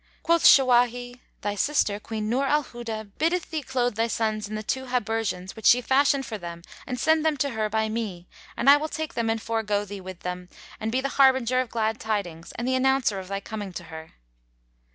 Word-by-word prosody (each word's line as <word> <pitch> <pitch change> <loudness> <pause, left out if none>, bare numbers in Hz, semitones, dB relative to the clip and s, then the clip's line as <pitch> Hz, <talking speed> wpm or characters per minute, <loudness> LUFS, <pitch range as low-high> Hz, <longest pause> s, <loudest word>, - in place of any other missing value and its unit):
Quoth 335 0 +3
Shawahi, 245 -1 +5 0.2
"Thy 205 0 -1
sister, 205 -2 +1
Queen 215 0 -4
Nur 250 +5 +1
al 295 +2 +2
Huda, 225 -4 -7
biddeth 335 +2 0
thee 315 -2 -2
clothe 250 -3 -1
thy 225 +2 0
sons 215 -2 -1
in 215 - -4
the 215 - -4
two 265 +4 -2
habergeons 225 -6 -2
which 220 - -1
she 245 - +7
fashioned 270 +2 +2
for 220 -3 -6
them 170 -1 -8 0.2
and 250 -2 -4
send 315 +2 +3
them 315 -2 +1
to 280 +1 0
her 215 -2 -1
by 220 +1 0
me, 210 -6 -4 0.3
and 240 - -1
I 285 +1 +9
will 310 +1 -3
take 315 -1 -4
them 230 -1 -1
and 225 0 0
forego 215 -2 -1
thee 200 -1 -8
with 185 -1 -9
them 180 0 -5 0.3
and 220 +1 -2
be 255 +2 +1
the 275 - -2
harbinger 260 -2 +4
of 255 - -5
glad 220 -1 -1
tidings 180 -7 -3
and 240 - -4
the 260 - +1
announcer 260 -5 +2
of 185 - -8
thy 195 +1 -3
coming 205 -1 -6
to 175 - -6
her." 160 0 -9
225 Hz, 215 wpm, -25 LUFS, 210-260 Hz, 0.3 s, I